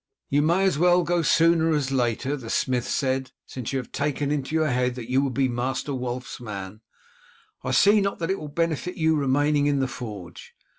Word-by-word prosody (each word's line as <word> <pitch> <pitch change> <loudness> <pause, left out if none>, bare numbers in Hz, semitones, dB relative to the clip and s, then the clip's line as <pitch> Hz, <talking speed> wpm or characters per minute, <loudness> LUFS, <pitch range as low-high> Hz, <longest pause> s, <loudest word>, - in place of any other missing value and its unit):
"You 145 +1 +3
may 170 +5 +2
as 185 -7 +2
well 175 +1 +4
go 175 0 +1
sooner 165 0 +3
as 140 -2 -1
later," 130 +2 0
the 125 -6 -8
smith 125 -1 0
said. 130 -1 -1 0.2
"Since 125 -4 -6
you 135 - -1
have 125 - -6
taken 145 0 -1
into 150 +1 -2
your 155 -1 +2
head 125 0 0
that 125 -1 -7
you 130 +1 +3
will 140 - 0
be 130 +1 +1
Master 130 +3 -2
Wulf's 125 0 -5
man, 105 -2 -7 0.8
I - - -3
see 205 +1 +5
not 195 0 -1
that 165 +2 -2
it 195 - -1
will 150 - -7
benefit 165 +3 -2
you 160 -1 +2
remaining 145 +1 +2
in 145 -1 +1
the 135 - +1
forge. 105 -9 -9
140 Hz, 205 wpm, -25 LUFS, 125-160 Hz, 0.8 s, see